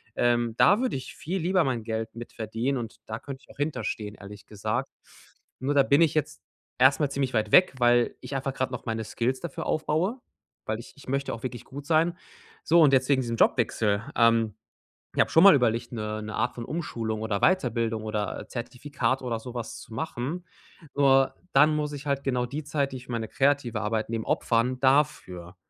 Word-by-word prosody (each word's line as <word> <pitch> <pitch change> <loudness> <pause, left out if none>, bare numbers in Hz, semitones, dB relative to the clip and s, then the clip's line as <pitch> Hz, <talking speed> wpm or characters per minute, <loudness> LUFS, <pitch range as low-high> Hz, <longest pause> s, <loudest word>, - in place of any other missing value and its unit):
Ähm, 120 -1 +2
da 205 - +5
würde 255 - 0
ich 130 - -9
viel 185 +5 -3
lieber 185 +1 +2
mein 125 -5 -1
Geld 110 0 -4
mit 120 0 -9
verdienen 115 +5 -2
und 115 -3 -6
da 110 +1 -5
könnt 135 0 -8
ich - - -24
auch - - -16
hinter 145 -4 -2
stehen, 105 0 -4
ehrlich 100 0 -12
gesagt. 110 +6 -3 0.7
Nur 135 +3 -1
da 140 - +6
bin 140 +3 +4
ich 165 -2 +4
jetzt 155 -2 -2 0.4
erst 130 +2 +5
mal 145 -3 +1
ziemlich 135 -2 -2
weit 110 -2 0
weg, 180 -4 +6
weil 120 0 +3
ich 130 +2 -6
einfach 135 0 -2
grad 130 -1 -1
noch 125 - -6
meine 115 -1 -2
Skills 125 +4 -1
dafür 170 -5 -6
aufbaue. 165 +10 0 0.5
Weil 110 - -2
ich 120 - -12
ich 140 - -16
möchte 140 +1 -1
auch 115 - -7
wirklich 125 -2 -5
gut 140 +1 -9
sein. 165 +2 +3 0.5
So 170 +2 +5
und 145 -3 +6
jetzt 130 0 +3
wegen 135 -2 +4
diesem 120 -2 -3
Jobwechsel. 110 -4 +2
Ähm, 115 -2 +3 0.6
ich - - +4
habe - - +1
schon 165 - +6
mal 200 -4 +9
überlegt, 120 -2 0
'ne 110 -1 -4
'ne 110 0 -6
Art 120 +2 0
von 120 - -6
Umschulung 115 -9 -3
oder 110 -2 -1
Weiterbildung 115 - +1
oder 105 -1 -3
Zertifikat 130 +2 -2
oder 120 -3 -2
so 125 +2 -9
was 120 -2 -5
zu 115 - -12
machen. 160 +6 -4 0.5
Nur 135 -1 +4 0.2
dann 150 +3 +5
muss 150 -1 -2
ich 145 0 -7
halt 140 -1 -1
genau 125 -2 0
die 145 +5 -5
Zeit, 145 -2 -1
die 130 - -5
ich 125 - -12
für - - -7
meine 115 -1 -2
kreative 135 -5 +1
Arbeit 110 0 -1
nehme 115 -1 -3
opfern 125 +2 +1
dafür. 130 - +1
125 Hz, 210 wpm, -27 LUFS, 115-145 Hz, 0.7 s, mal